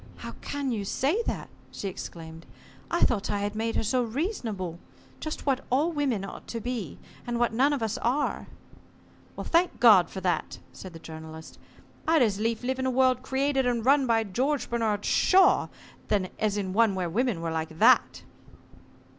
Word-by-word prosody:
"How - - -8
can 285 -2 -3
you 215 -4 -2
say 285 - 0
that?" - - -3 0.2
she 200 - -5
exclaimed. 165 -3 -8 0.4
"I 340 - 0
thought 210 -5 +1
I 205 -1 -1
had 205 0 -2
made 225 +1 -2
her - - 0
so 250 +4 +1
reasonable. 225 - -3 0.4
Just 310 - -5
what 270 -2 +1
all 290 +7 +2
women 270 - -1
ought - - -10
to 230 - -4
be, 230 - -4 0.3
and 240 0 -1
what 235 -1 +1
none 265 +5 +3
of 280 -5 -1
us 220 -1 -2
are." 270 +5 -1 0.9
"Thank 340 -4 +1
God 210 -8 +7
for 190 - -6
that," 180 -3 -1 0.2
said 185 -2 -10
the - - -8
Journalist. 160 0 -10 0.5
"I'd 320 -4 +5
as 205 -3 0
lief 225 +1 -1
live 260 +1 -1
in 260 - 0
a - - +2
world 255 0 +3
created 265 0 0
and 235 -2 0
run 275 0 +4
by 225 -1 +3
George 255 +9 -1
Bernard 220 -3 0
Shaw 380 0 +4 0.7
as 210 -1 0
in 190 -2 -3
one 220 -2 +3
where 185 -2 -1
women 220 +2 0
were 165 0 -3
like 160 0 -4
that." - - +4
230 Hz, 180 wpm, -27 LUFS, 195-265 Hz, 0.9 s, God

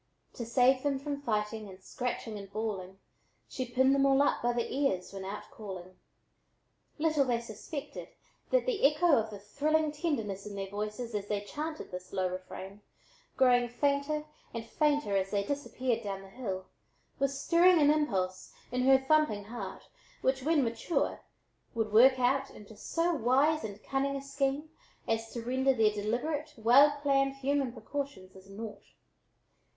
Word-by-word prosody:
To 235 - -6
save 255 +2 +4
them 280 -1 0
from 280 +1 -4
fighting 215 -3 -2
and 185 -1 -12
scratching 230 +2 -4
and 200 -1 -10
bawling, 200 -3 -4 0.5
She 255 -1 -4
pinned 260 +2 +4
them 275 0 +4
all 270 0 +4
up - - +1
by 240 - +2
the 240 -1 -1
ears 260 -11 0
when 195 -1 -6
out 200 +2 -5
calling. 185 -3 -9 1.0
Little 310 -2 +2
they 245 -3 +1
suspected 255 +6 -7 0.4
that - - +3
the - - -1
echo 300 +3 +5
of 220 -2 +1
the 210 - -7
thrilling 300 +9 0
tenderness 225 - -2
in 205 - -7
their 195 -1 -5
voices 210 +3 -4
as 205 -1 -3
they 205 -1 -1
chanted 305 +9 -6
this 180 0 -7
low 185 -1 0
refrain, 190 +2 -8 0.6
growing 245 -2 +4
fainter 280 +4 0 0.3
and 230 -1 -4
fainter 290 -6 +1
as 195 0 +1
they 200 0 0
disappeared 255 -2 -2
down 195 -1 -4
the 195 - -13
hill, 195 -4 -5 0.5
was 275 0 0
stirring 345 +3 +5
an 295 -1 +6
impulse 190 -12 -1 0.2
in 250 +1 0
her 265 0 +7
thumping 265 -6 +2
heart, 235 +4 -7 0.3
which 265 0 +1
when 300 +1 +3
mature, 230 +8 -1 0.6
would 220 -2 -1
work 260 +4 +7
out 270 +2 +2
into 210 +1 -13
so 335 +11 0
wise 285 +4 +3
and 210 -1 -7
cunning 275 0 -1
a 275 - -3
scheme 275 +2 -1 0.4
as 225 0 -1
to 235 - -5
render 260 +2 +2
their 215 -2 +3
deliberate, 285 +9 -2
well 275 +6 +6
planned 275 -1 +2
human 275 -1 0
precautions 265 -6 -6
as 190 +1 -15
naught. 210 +2 -7
250 Hz, 165 wpm, -31 LUFS, 210-285 Hz, 1.0 s, her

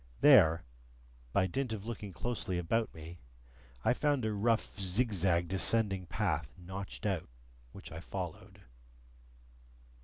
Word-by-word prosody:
There, 80 0 +7 0.7
by 95 - +3
dint 120 +6 -2
of 105 -1 -5
looking 110 -4 -5
closely 105 -3 -3
about 110 +7 0
me, 80 +2 -10 0.7
I - - +5
found 145 -2 +1
a 110 - 0
rough 110 +1 0
zigzag 95 -4 +1
descending 95 0 +1
path 80 - -1
notched 95 +4 -7
out, 95 -9 -1 0.4
which - - -11
I - - -6
followed. - - -7
95 Hz, 120 wpm, -33 LUFS, 85-110 Hz, 0.7 s, There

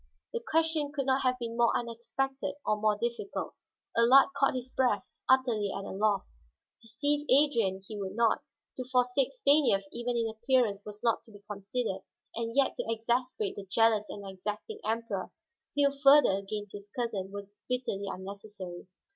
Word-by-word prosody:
The 470 - -1
question 320 -2 +1
could 280 -3 -2
not 265 0 +2
have 255 -1 +1
been 230 -2 -5
more 235 -1 +3
unexpected 255 +4 -3
or 210 0 0
more 215 -1 +3
difficult. 235 - -3 0.4
Allard 250 +4 +7
caught 275 -1 +2
his 255 0 -4
breath, 250 -5 +1 0.2
utterly 240 -6 +3
at 195 - -5
a - - -6
loss. 200 - -1 0.4
Deceive 285 +6 -1
Adrian 235 -9 +3
he 215 -2 -6
would 195 0 -4
not. 230 -1 +3 0.4
To 255 - -2
forsake 250 +1 +2
Stanief 285 - +4
even 240 0 -2
in 230 -1 +1
appearance 225 -2 +1
was 210 0 -9
not 230 -2 +2
to 225 - -16
be 205 -1 -15
considered, 200 0 -3 0.3
and 230 +1 -3
yet 275 -1 +3
to - - -2
exasperate 235 -1 -1
the 200 -1 -8
jealous 215 0 +3
and 200 -1 -7
exacting 210 - -5
Emperor 220 -4 -2 0.2
still 285 0 0
further 280 -2 +6
against 200 +1 -4
his 205 0 -9
cousin 215 -5 -3
was 200 0 -8 0.2
bitterly 245 -6 -2
unnecessary. 190 -2 -8
230 Hz, 165 wpm, -30 LUFS, 205-260 Hz, 0.4 s, Allard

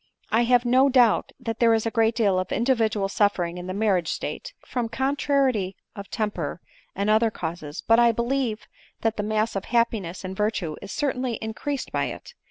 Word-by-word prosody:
I 235 +2 +3
have 245 0 +3
no 260 +3 +4
doubt 245 -4 +4
that 230 -3 -4
there 230 -1 +5
is 225 - -1
a 225 - 0
great 225 0 +2
deal 200 -5 +2
of 185 - -4
individual 225 -5 +1
suffering 180 -4 0
in 180 - -7
the - - -3
marriage 195 -5 +1
state, - - -4
from 240 -3 -2
contrariety 265 -6 0 0.2
of 200 -2 -8
temper 205 -8 -3 0.4
and 200 +2 -1
other 220 +2 +4
causes; 160 -6 -6
but 230 +1 +5
I 235 -1 +6
believe 235 -1 -1 0.4
that 225 -1 0
the - - 0
mass 215 +1 0
of 195 - -3
happiness 220 -7 0
and 185 +1 -5
virtue 200 -6 -1
is 200 - -8
certainly 260 -5 -1
increased 225 +6 -4
by - - 0
it. - - -8
220 Hz, 185 wpm, -25 LUFS, 200-240 Hz, 0.4 s, I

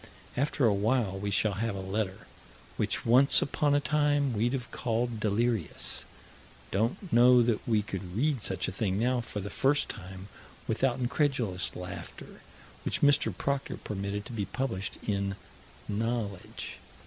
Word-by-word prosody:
After 140 0 +1
a 110 - +5
while 105 -1 +1
we 100 +1 -2
shall 100 +1 +3
have 115 -3 -1
a - - -4
letter, 95 0 -3 0.5
which - - -1
once 130 +4 +6
upon 145 +1 +1
a - - +4
time 145 -1 +2
we'd 115 +4 +1
have 130 -2 -4
called 120 -1 -1
delirious 110 +2 0 0.7
don't 120 - -1
know 125 +1 +7
that 115 -2 +1
we 110 -3 +2
could 95 -2 -5
read 140 -1 +1
such 95 - -1
a - - -2
thing 95 -1 -1
now, 125 +3 +2
for 110 -3 -5
the 100 - -6
first 145 +2 +2
time, 95 -1 -7 0.4
without 120 +2 +1
incredulous 125 - 0
laughter 90 0 -8 0.4
which - - -1
Mr. 145 0 +4
Proctor 140 -1 -1
permitted 100 0 -4
to 125 - -8
be 105 -3 -1
published 100 -2 -3
in 100 -1 0 0.5
Knowledge. 105 -3 -3
115 Hz, 150 wpm, -30 LUFS, 100-130 Hz, 0.7 s, know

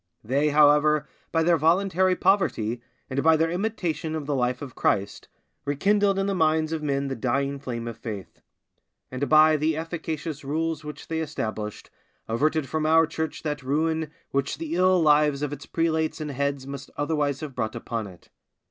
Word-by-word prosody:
They, 140 +7 +1
however, 150 0 +4 0.2
by 165 -1 +2
their 170 0 +4
voluntary 185 +3 +3
poverty, 125 - +1 0.3
and 130 +1 -1
by 160 +1 +5
their 165 +1 +1
imitation 175 -5 -2
of 155 -2 -4
the 145 - -1
life 125 -1 0
of 130 -4 -8
Christ, 100 0 -1 0.4
rekindled 195 +7 +2
in 195 - +1
the 200 - 0
minds 160 -2 +2
of 160 - -2
men 140 -2 -1
the 135 - -3
dying 140 +4 -1
flame 120 -4 -5
of 115 -1 -7
faith; 105 -5 -7 0.7
and 130 +1 -2
by 155 +1 +6
the 155 +1 0
efficacious 160 -2 -4
rules 160 +2 -2
which 150 -1 -8
they 160 0 -2
established 110 -8 -4 0.4
averted 150 +5 +1
from 155 +1 -1
our 165 +1 +5
Church 160 0 -4
that 150 -2 -2
ruin 160 +3 0 0.2
which 140 0 -1
the 165 -1 -5
ill 185 +1 +4
lives 150 -2 +3
of 145 -1 -2
its 145 -1 -9
prelates 160 -1 0
and 150 -1 -4
heads 140 0 -2
must 140 0 -7
otherwise 145 -2 0
have 150 -3 -6
brought 110 -3 -3
upon 115 -3 -4
it. 90 -3 -15
150 Hz, 175 wpm, -25 LUFS, 140-160 Hz, 0.7 s, by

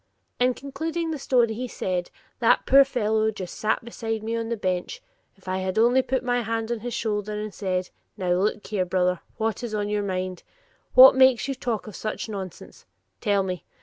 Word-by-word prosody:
In 250 0 +3
concluding 320 +4 -3
the 305 - -4
story 240 -4 +2
he 250 +3 -4
said; 180 -6 -3 0.3
"That - - +3
poor 275 +1 +7
fellow 220 -5 0
sat 220 - -2
just 215 +4 -2
beside 225 -2 -4
me 225 +1 -2
on 230 0 -3
my 235 - 0
bench; 185 - -2 0.4
if 195 -1 -24
I 185 0 -1
had 185 +1 -3
only 240 +4 +5
put 260 0 -1
my 245 0 +1
hand 225 0 -2
on 235 - -1
his 240 +1 -5
shoulder 210 -2 -2
and 210 -1 -5
said, 185 -2 -2 0.3
'Now, 185 -3 -1
look 200 +4 0
here, 200 -3 -1
brother, 180 0 +1 0.2
what 225 0 -1
is 235 -3 -4
on 205 -1 -1
your 210 0 0
mind? 185 -2 -3 0.5
What 260 +1 +11
makes 260 -1 +5
you 275 - -1
talk 240 -4 -3
such 215 +3 -4
nonsense? 195 -5 -8 0.3
Tell 200 -3 +1
me. 185 -2 -4
220 Hz, 195 wpm, -25 LUFS, 190-245 Hz, 0.5 s, What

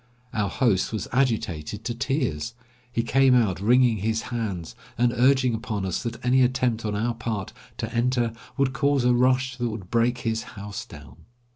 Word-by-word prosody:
Our 105 -3 0
host 105 -4 +1
was 110 -4 -3
agitated 110 - -1
to 120 - -1
tears; 115 - -2 0.4
he 115 -1 0
came 130 +2 +4
out 105 -8 +2
wringing 120 +1 +4
his 110 +3 -1
hands, 100 -8 -3 0.2
and 120 0 +2
urging 130 0 +3
upon 110 -3 -3
us 95 - -2
that 115 +1 -5
any 130 +1 +4
attempt 125 -2 +1
on 105 -1 -1
our 115 +3 0
part 110 -4 -4 0.2
to 110 +1 -4
enter 120 -1 +1 0.2
would 135 -2 +1
cause 140 -1 +2
a 125 - +5
rush 130 +1 +2
that 120 -1 -1
would 105 -5 -7
break 120 +1 +2
his 115 -1 -1 0.2
house 100 0 -6
down. 70 -4 -13
115 Hz, 175 wpm, -25 LUFS, 105-125 Hz, 0.4 s, a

